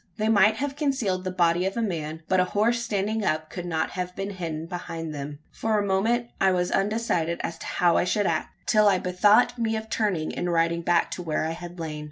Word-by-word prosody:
They 215 +1 0
might 215 0 +5
have 275 +3 -3
concealed 260 - 0
the - - 0
body 175 -1 +2
of 195 - -4
a - - +1
man; 160 -5 -3
but 185 - +2
a - - +5
horse 235 +3 +3
standing 215 -1 -1
up 155 -3 -1
could 175 -1 -5
not 160 -2 -1
have 180 0 -4
been 195 +1 -4
hidden 165 -4 -4
behind 165 -2 -5
them. 145 0 -6
For 220 -1 0
a 205 - +1
moment 225 +5 +1
I 190 -1 +5
was 180 -1 0
undecided 195 -5 0
as 165 0 -4
to - - -8
how 175 -2 +2
I - - +3
should 200 +3 +1
act 160 -3 -2
till 215 -1 +4
I 195 -2 +5
bethought 205 +7 +3
me 225 -1 0
of 220 0 -5
turning, 190 -8 0
and 175 - -1
riding 170 0 +1
back 170 0 +2
to - - -4
where 155 -2 -1
I 160 - -1
had 175 +1 -8
lain. 155 -2 -4
185 Hz, 235 wpm, -26 LUFS, 170-215 Hz, -, might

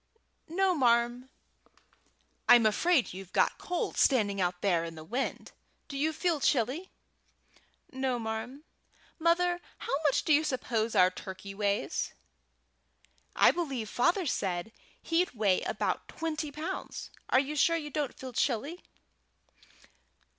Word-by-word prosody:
"No, 375 +3 +2
marm." 240 -2 +2 1.2
"I'm 240 -2 +8
afraid 275 - +2
you've 190 0 -9
got - - +2
cold 355 -1 -3
standing 205 -7 +3
out 180 0 -1
there 175 -4 +2
in 165 -1 -6
the 155 - -9
wind. 245 +11 -3 0.4
Do 280 - -8
you 300 +3 +1
feel 330 0 0
chilly?" 275 - +1 1.0
"No, 260 -2 -1
marm. 225 +5 -5 0.6
Mother, 350 +2 +2 0.2
how - - -5
much 290 -3 +2
do 310 - +3
you 300 +2 +4
suppose 235 -5 -1
our 185 0 +6
turkey 190 +1 -8
weighs?" 200 0 -1 1.2
"I - - +6
believe 270 - -3
father 350 +9 +2
said 190 - -2 0.3
he'd 335 -2 +1
weigh 200 -4 +2
about - - -2
twenty 310 -2 -4
pounds. 320 +6 -5 0.2
You 275 +3 +3
are - - -6
sure 335 +3 +3
you 295 -2 -6
don't 290 -3 -2
feel 260 -1 -8
chilly?" 280 +9 -1
260 Hz, 130 wpm, -30 LUFS, 215-315 Hz, 1.2 s, I'm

